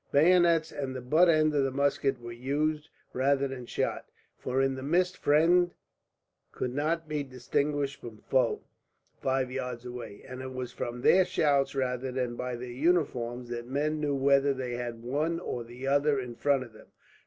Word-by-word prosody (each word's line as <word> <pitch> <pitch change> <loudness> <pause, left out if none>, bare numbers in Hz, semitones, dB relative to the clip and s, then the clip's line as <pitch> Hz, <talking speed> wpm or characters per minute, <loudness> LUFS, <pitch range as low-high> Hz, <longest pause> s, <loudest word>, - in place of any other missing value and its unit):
Bayonets 165 +1 +4
and 135 -2 -4
the - - -3
butt 155 +8 +4
end 155 -1 +4
of 145 -2 +2
the 135 - +1
musket 140 -1 0
were 120 0 -8
used, 150 +5 -1 0.2
rather 140 +1 +2
than 130 -2 -7
shot; - - -2 0.3
for 130 +1 -1
in 135 0 +2
the 130 - -6
mist 180 +6 +1
friend 175 +4 +3 0.8
could 125 - -3
not 160 +4 -1
be 150 -1 -2
distinguished 140 +2 -2
from 115 -2 -9
foe 125 +1 0 0.6
five 130 -1 0
yards 125 -2 -4
away, 120 -4 -8
and 130 0 -7
it 130 0 -6
was 125 -1 -5
from 120 -1 -5
their 185 +8 +6
shouts 145 -7 +1
rather 130 -1 -1
than 125 -2 -2
by 125 0 -3
their 125 +1 -7
uniforms 125 -5 0
that 120 0 -5
men 150 +4 -1
knew 145 -2 0
whether 140 0 +3
they 125 -2 -4
had 120 -1 -5
one 155 +7 -1
or 120 -9 -5 0.2
other 140 0 +3
in 125 -2 -5
front 140 +2 +1
of 120 -3 -14
them. 110 - -16
135 Hz, 175 wpm, -29 LUFS, 125-150 Hz, 0.8 s, their